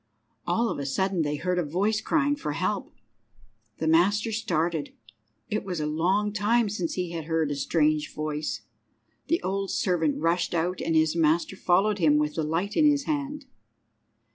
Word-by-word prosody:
All 225 +7 +1
of - - -3
a 140 - -3
sudden 190 +5 0
they 150 -1 -1
heard 180 +4 -1
a - - +1
voice 200 +8 0
crying 290 -1 +1
for 150 - -4
help. 185 +5 -2 0.9
The 160 - -2
master 200 +7 +3
started. 170 -7 -1 0.5
It 215 - -2
was 180 -4 -4
a 150 - -1
long 185 +7 +1
time 215 +2 +2
since 180 -5 -3
he 180 -2 -2
had 165 -2 -5
heard 160 -2 0
a - - -1
strange 150 +1 +1
voice. 155 0 -3 0.7
The 335 - +1
old 195 +1 -2
servant 165 -6 0
rushed 170 +2 0
out, 175 +2 -1
and 165 -1 0
his 160 0 +3
master 165 +3 +2
followed 195 +3 +2
him 150 -3 +4
with 150 0 0
the 160 - -2
light 170 +7 -2
in 305 -2 +5
his 285 -1 +1
hand. 290 -1 -3
175 Hz, 175 wpm, -26 LUFS, 160-210 Hz, 0.9 s, in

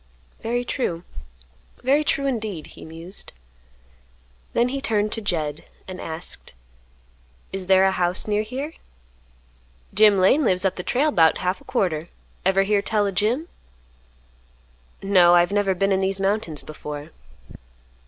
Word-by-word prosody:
"Very 245 +2 -1
true, 175 -11 -2 0.8
very 280 +4 +3
true, 275 -2 0
indeed," 215 - -2
he - - -12
mused. 165 +4 -7 1.2
Then 240 +1 +2
he 275 +1 -3
turned 215 -5 +1
to 225 - -2
Jed, 155 -7 -2 0.2
and 185 -1 -7
asked, 160 +1 -5 1.0
"Is 190 -1 -4
there 190 0 +5
a 190 - +4
house 180 0 +2
near 210 0 +1
here?" 265 +8 -5 1.2
"Jim 210 -2 +6
Lane 195 +11 +4
lives 185 -5 +2
up 190 - +1
the - - -4
trail 280 +10 +1
'bout 160 - +4
half 185 +1 -2
a - - -18
quarter. 165 -3 -1 0.3
Ever 195 +1 +3
hear 200 0 +2
tell 210 0 +1
o' 200 - 0
Jim?" 225 - 0 1.6
"No, 180 -3 +6
I 175 - +7
have 175 - 0
never 200 -2 +1
been 195 +2 +1
in 190 0 +2
these 195 0 0
mountains 195 -6 -1
before." 150 0 -8
195 Hz, 145 wpm, -23 LUFS, 175-220 Hz, 1.6 s, I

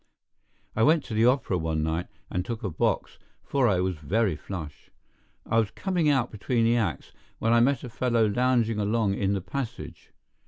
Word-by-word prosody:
I 110 - 0
went 155 +4 +4
to 115 - -7
the 110 +2 +4
opera 125 -8 +1
one 80 -1 -1
night 80 +3 -1 0.2
and 90 - -1
took 115 +3 -5
a 100 - -2
box, 75 - -1 0.2
for 135 -3 +1
I 95 -5 +2
was 90 -2 -1
very 95 +5 0
flush. 80 -3 -8 0.6
I 115 - +2
was 110 -3 +1
coming 175 - 0
out 130 -4 +1
between 115 +2 0
the 115 +1 +3
acts 100 - -2 0.3
when 115 +1 +1
I 120 - +5
met 130 +1 +2
a 125 - -6
fellow 115 -1 +1
lounging 115 0 +1
along 105 -1 +1
in 100 0 0
the 100 - -1
passage. 115 +7 -6
110 Hz, 190 wpm, -27 LUFS, 95-125 Hz, 0.6 s, I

